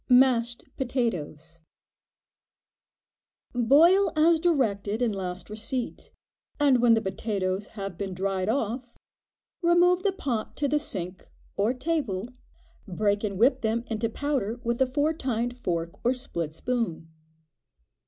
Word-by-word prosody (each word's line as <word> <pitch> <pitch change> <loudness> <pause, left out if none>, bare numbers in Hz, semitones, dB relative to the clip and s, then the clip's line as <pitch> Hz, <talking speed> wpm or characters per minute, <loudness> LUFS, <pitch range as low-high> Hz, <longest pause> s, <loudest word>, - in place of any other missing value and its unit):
Mashed 245 -2 +4
Potatoes. 170 - -3 1.9
Boil 320 - +5
as 325 +1 +5
directed 225 - +1
in 245 -3 +1
last 185 -2 -5
receipt, 225 +4 -4 0.5
and 275 -4 +4
when 235 -2 +6
the 225 - +1
potatoes 190 -1 -2
have 195 -3 -5
been 195 -2 -3
dried 190 +1 -1
off, 245 0 -2 0.6
remove 350 +1 +4
the 400 - +2
pot 260 - -3
to 285 - +1
the 295 +2 +2
sink, 185 - -6 0.3
or 205 +4 +2
table, 255 - -2 0.6
break 205 +2 0
and 200 -3 -2
whip 255 +5 +4
them 225 +1 0
into 225 +1 0
powder 245 -4 -2
with 235 +2 -1
a 265 - +5
four 290 +4 +1
tined 245 -5 -2
fork, 170 -7 -2
or 240 - +3
a - - -7
split 170 - -4
spoon. 230 -8 -2
235 Hz, 130 wpm, -27 LUFS, 195-265 Hz, 1.9 s, when